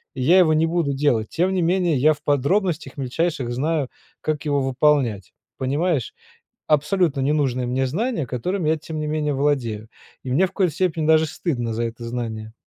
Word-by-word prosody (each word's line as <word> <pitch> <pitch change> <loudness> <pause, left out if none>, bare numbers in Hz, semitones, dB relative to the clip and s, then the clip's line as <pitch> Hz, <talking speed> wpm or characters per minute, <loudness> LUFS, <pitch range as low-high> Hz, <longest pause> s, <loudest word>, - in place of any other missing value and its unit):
и 130 - -4
я 170 +8 +5
его 160 -4 +5
не 160 +1 +2
буду 165 -4 0
делать, 135 -6 +1
тем 180 +3 0
не 185 - +1
менее 175 -3 +2
я 155 +4 +4
в 145 0 -15
подробностях 155 +1 0
мельчайших 135 -1 -2
знаю 145 +2 -1 0.3
как 155 -1 -2
его 145 -2 +1
выполнять. 130 -6 +1 0.2
Понимаешь? 145 +1 -1 0.5
Абсолютно 150 -1 +2
не 145 +3 +1
нужные 130 -4 0
мне 130 +1 0
знания, 180 - -2
которыми 160 +8 -2
я 160 - +2
тем 155 0 -6
не 150 - -2
менее 150 -1 -1
владею, 125 -7 -1 0.3
и 130 - -5
мне 175 +9 +4
в - - -16
коей 185 -4 +2
степени 160 -2 -1
даже 160 0 +5
стыдно 125 -8 -3
за 115 +1 -2
это 115 +1 -6
знание. 110 -2 -5
150 Hz, 185 wpm, -22 LUFS, 130-165 Hz, 0.5 s, я